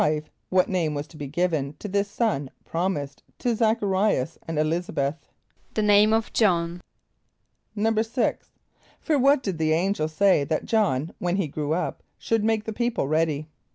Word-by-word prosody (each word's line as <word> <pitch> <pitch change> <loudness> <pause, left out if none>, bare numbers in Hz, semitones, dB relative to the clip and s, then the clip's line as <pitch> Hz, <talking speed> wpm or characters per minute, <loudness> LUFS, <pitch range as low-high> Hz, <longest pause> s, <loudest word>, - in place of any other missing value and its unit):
= - - -37
What 185 -1 +3
name 165 -5 0
was 145 +1 -3
to - - -16
be 145 - -5
given 155 -2 -1
to 210 - -6
this 200 +1 0
son 205 - -1 0.2
promised 160 -5 -2 0.2
to 245 - -1
Z[)a]ch 220 0 +2
a - - +2
r[=i]´as 190 -7 +1
and 165 -1 -3
[+E] - - +3
l[)i][s+]´a 170 +3 -1
b[)e]th? 140 +1 0 0.6
=The 215 - +1
name 210 +1 +5
of 225 0 0
J[)o]hn.= 175 -5 +2 1.0
=6.= 225 +3 +1 0.6
For 305 -3 +1
what 275 +1 +4
did 185 -5 -3
the 155 0 +2
angel 175 -1 +1
say 170 0 +3
that 155 +2 -2
J[)o]hn, 170 - +1
when 175 0 0
he 195 -4 0
grew 150 +1 -2
up, 180 - -2 0.2
should 225 -2 0
make 220 -1 +1
the 220 - -5
people 235 - -1
ready? 155 -1 0
180 Hz, 180 wpm, -25 LUFS, 155-215 Hz, 1.0 s, name